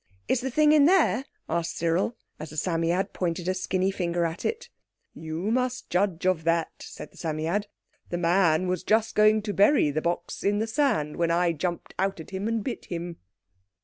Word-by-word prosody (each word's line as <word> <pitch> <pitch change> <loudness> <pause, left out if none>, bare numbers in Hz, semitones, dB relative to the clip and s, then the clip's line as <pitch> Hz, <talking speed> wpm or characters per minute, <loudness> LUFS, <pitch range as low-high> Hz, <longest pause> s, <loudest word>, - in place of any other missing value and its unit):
"Is 255 - +1
the 265 - -2
thing 300 +4 +4
in 300 -2 +6
there?" 315 -8 +3 0.2
asked 170 0 -2
Cyril, 170 +7 0 0.2
as 155 0 -7
the 155 - -10
Psammead 170 +3 0
pointed 175 -1 -2
a 185 - +2
skinny 185 0 0
finger 175 -2 -1
at 165 0 -4
it. 460 +1 -2 0.5
"You 160 +6 -4
must 255 +1 -1
judge 180 -1 0
of 185 -3 +2
that," 165 0 +1
said - - -9
the - - -20
Psammead. 165 +6 -2 0.4
"The 175 - -2
man 175 0 +3
was 180 -1 -1
just 220 +3 +1
going 215 0 +4
to 205 -1 -3
bury 200 - +4
the 155 +2 -1
box 170 +1 -3
in 205 +1 +2
the 220 - 0
sand 225 - 0
when 170 -1 +1
I 170 +1 +2
jumped 170 +2 -4
out 195 -1 0
at 160 - -10
him 195 +2 -3
and 225 -2 -1
bit 250 - -5
him." 170 -1 -5
185 Hz, 195 wpm, -26 LUFS, 170-215 Hz, 0.5 s, in